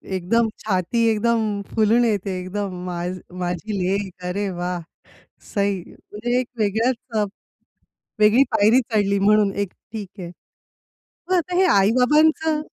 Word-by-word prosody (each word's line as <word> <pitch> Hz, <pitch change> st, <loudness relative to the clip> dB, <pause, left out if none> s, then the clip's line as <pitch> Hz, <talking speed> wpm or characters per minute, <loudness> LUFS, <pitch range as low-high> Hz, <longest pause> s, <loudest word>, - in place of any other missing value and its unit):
एकदम 220 Hz, +6 st, +1 dB
छाती 210 Hz, +3 st, 0 dB
एकदम 220 Hz, -2 st, 0 dB
फुलून 225 Hz, +2 st, +3 dB
येते 200 Hz, -4 st, -1 dB
एकदम 190 Hz, +1 st, -4 dB
मा 175 Hz, -1 st, -4 dB, 0.4 s
माझी 180 Hz, +4 st, -3 dB
लेक, 190 Hz, +1 st, -1 dB
अरे 195 Hz, +2 st, -2 dB
वाह! 175 Hz, -1 st, -3 dB, 0.7 s
सही! 200 Hz, -2 st, 0 dB
म्हणजे 240 Hz, +4 st, -3 dB
एका 250 Hz, -1 st, -9 dB
वेगळ्याच 225 Hz, +5 st, +1 dB, 0.3 s
अ, 210 Hz, -, +2 dB, 1.0 s
वेगळी 215 Hz, +5 st, +6 dB
पायरी 220 Hz, +6 st, +5 dB
चढली 200 Hz, -2 st, +2 dB
म्हणून 210 Hz, 0 st, +3 dB
एक 200 Hz, -2 st, -2 dB, 0.2 s
ठीक 210 Hz, -3 st, -5 dB
आहे. 175 Hz, -, -6 dB, 1.0 s
मग 370 Hz, -, +2 dB
आता 355 Hz, +1 st, -1 dB
हे 380 Hz, -, +4 dB
आई-बाबांचं 300 Hz, +8 st, +3 dB
210 Hz, 125 wpm, -22 LUFS, 190-235 Hz, 1.0 s, वेगळी